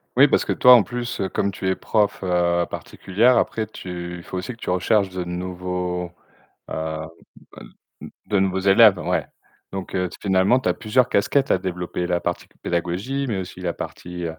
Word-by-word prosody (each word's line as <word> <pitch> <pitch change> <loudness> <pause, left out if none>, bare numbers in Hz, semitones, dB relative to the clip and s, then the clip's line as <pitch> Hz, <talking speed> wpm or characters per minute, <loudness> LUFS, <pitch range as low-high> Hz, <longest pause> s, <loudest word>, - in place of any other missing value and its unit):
Oui, - - +7
parce - - +2
que - - 0
toi 125 - +7
en 120 - +8
plus, 120 +1 -5
heu, 95 - -1
comme 100 - -1
tu 95 0 -5
es 95 - +2
prof 105 -3 0
heu 85 -1 +1
particulière, 115 +7 +1
après 110 -1 0
tu 90 -4 -7
il 85 - -11
faut 95 - -6
aussi 95 +7 -4
que - - -16
tu - - -6
recherches 95 +2 +2
de 90 -1 -4
nouveaux, 90 0 -4 0.6
heu 80 0 -3 1.3
de 100 -2 +2
nouveaux 95 0 +1
élèves 100 +1 +6
ouais. - - -1 0.5
Donc, 95 -1 -5
heu, 90 -1 0
finalement, 95 +5 +3
tu - - -1
as - - +3
plusieurs 125 +3 +1
casquettes 135 +7 +2
à - - +4
développer, 90 -1 -3
la 90 -1 +1
partie 85 - -3 0.2
pédagogie, 90 +11 -2
mais 110 -5 -1
aussi 90 0 -7
la 85 -2 -2
partie 90 0 -7
95 Hz, 185 wpm, -22 LUFS, 90-105 Hz, 1.3 s, en